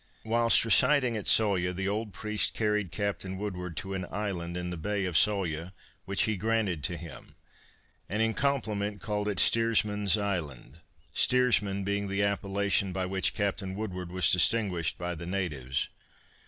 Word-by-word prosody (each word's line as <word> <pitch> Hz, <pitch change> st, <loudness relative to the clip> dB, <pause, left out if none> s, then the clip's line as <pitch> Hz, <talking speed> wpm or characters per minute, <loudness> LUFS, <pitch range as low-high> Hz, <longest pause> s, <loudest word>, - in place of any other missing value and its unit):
Whilst 115 Hz, +1 st, +4 dB
residing 125 Hz, +1 st, +4 dB
at 105 Hz, -, -4 dB
Sawyah 95 Hz, -5 st, +3 dB
the 95 Hz, +2 st, -2 dB
old 105 Hz, +1 st, -2 dB
priest 105 Hz, +1 st, -1 dB
carried 105 Hz, -4 st, 0 dB
Captain 100 Hz, -2 st, -3 dB
Woodward 90 Hz, -4 st, -5 dB
to 95 Hz, +4 st, -4 dB
an 95 Hz, -2 st, -4 dB
island 90 Hz, -4 st, -4 dB
in 90 Hz, 0 st, -4 dB
the -, -, -3 dB
bay 100 Hz, +3 st, -2 dB
of 90 Hz, -, -3 dB
Sawyah, 90 Hz, -3 st, +1 dB, 0.3 s
which 100 Hz, +1 st, +1 dB
he 110 Hz, -2 st, 0 dB
granted 105 Hz, -6 st, -1 dB
to 85 Hz, -, -2 dB
him, 80 Hz, -3 st, -11 dB, 0.7 s
and 105 Hz, +4 st, -2 dB
in 115 Hz, 0 st, +2 dB
compliment 105 Hz, -7 st, -1 dB
called 105 Hz, -1 st, -3 dB
it 105 Hz, -2 st, -1 dB
Steersman's 105 Hz, -3 st, +3 dB
Island, 80 Hz, -9 st, -4 dB, 0.3 s
steersman 105 Hz, -6 st, +2 dB
being 100 Hz, +1 st, -1 dB
the 100 Hz, +1 st, 0 dB
appellation 100 Hz, -1 st, 0 dB
by 95 Hz, 0 st, -2 dB
which 95 Hz, +1 st, -1 dB
Captain 100 Hz, -2 st, -2 dB
Woodward 90 Hz, -4 st, -5 dB
was 90 Hz, -3 st, +2 dB
distinguished 90 Hz, -3 st, +2 dB
by 90 Hz, 0 st, -3 dB
the 85 Hz, +1 st, -8 dB
natives. 75 Hz, -9 st, -2 dB
100 Hz, 155 wpm, -29 LUFS, 90-105 Hz, 0.7 s, Whilst